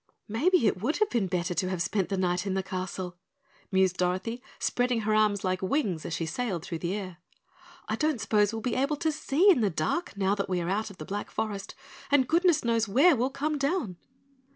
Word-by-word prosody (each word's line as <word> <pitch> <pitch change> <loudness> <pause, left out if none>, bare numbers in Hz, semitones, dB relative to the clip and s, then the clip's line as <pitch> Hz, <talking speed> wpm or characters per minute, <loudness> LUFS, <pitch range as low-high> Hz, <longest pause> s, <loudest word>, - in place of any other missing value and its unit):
"Maybe 295 - +2
it 190 -3 +1
would 290 +9 0
have 425 -1 +1
been 225 -5 +1
better 180 -1 -1
to 185 +1 -1
have 185 -2 -2
spent 185 +2 0
the 195 - -1
night 180 +1 0
in 190 - -1
the 190 - 0
castle," 185 -1 -5 0.5
mused 190 -1 +2
Dorothy, 185 +7 -1 0.2
spreading 245 -2 0
her 215 0 0
arms 210 -2 +2
like 185 -1 0
wings 190 - -1
as 165 - -3
she 165 - -2
sailed 175 -1 -3
through 165 - -4
the 175 +3 -2
air. 185 -4 -6 0.7
"I 220 - -1
don't 305 -3 +1
suppose 210 -2 +2
we'll 225 -1 -5
be 245 - -1
able 275 +3 +1
to 320 +1 0
see 315 +6 +3
in 305 - +3
the 210 - +3
dark 185 - -2
now 195 0 +2
that 200 -1 -2
we 180 -1 0
are 170 0 -2
out 215 +3 -1
of 200 - -13
the 155 - -7
Black 205 +4 -4
Forest, 200 -3 -4 0.3
and 280 -3 +4
goodness 335 -2 +3
knows 230 -1 +2
where 280 - +5
we'll 250 +2 0
come 295 +2 -2
down." 275 - -1
210 Hz, 225 wpm, -28 LUFS, 185-260 Hz, 0.7 s, where